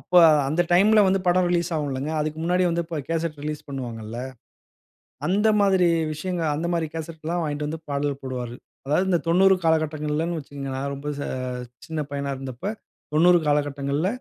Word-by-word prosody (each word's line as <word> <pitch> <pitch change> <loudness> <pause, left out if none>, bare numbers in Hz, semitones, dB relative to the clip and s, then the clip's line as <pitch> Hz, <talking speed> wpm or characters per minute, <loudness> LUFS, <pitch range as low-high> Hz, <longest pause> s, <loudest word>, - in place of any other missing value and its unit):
அப்ப, 180 - -10 0.3
அந்த 160 +5 +2
டைம்ல 210 +5 +6
வந்து 190 0 +2
படம் 180 0 +4
ரிலீஸ் 175 0 +1
ஆகுல்லங்க. 145 -1 -2
அதுக்கு 155 +1 -2
முன்னாடியே 180 +2 +2
அப்ப 170 0 -5
வந்து 145 -3 -4
கேசெட் 165 -1 -1
ரிலீஸ் 150 0 -4
பண்ணுவாங்கள்ள. 115 -5 -6 1.1
அந்த 205 +5 +3
மாதிரி 190 -3 +4 0.2
விஷயங்க, 175 +3 -3
அந்த 160 +3 -2
மாதிரி 165 -2 0
கேசெட்லா 160 +1 -4
வாங்கிட்டு 150 -1 -2
வந்து 160 +2 -4
பாடல் 140 0 -1
போடுவாரு. 125 -2 -4 0.3
அதாவது 155 +7 +2
இந்த 175 - +4
90 190 +3 +5
காலகட்டங்கள்ளனு 155 +1 0
வச்சுக்கங்க. 140 -2 -7
நா - - -3
ரொம்ப 140 +2 -6
ச - - -3 0.6
சின்ன 160 -1 -3
பையனா 140 0 -3
இருந்தப்ப, 130 +3 -8 0.5
90 175 +3 +6
காலகட்டங்கள்ள 145 +1 0
155 Hz, 155 wpm, -24 LUFS, 145-175 Hz, 1.1 s, டைம்ல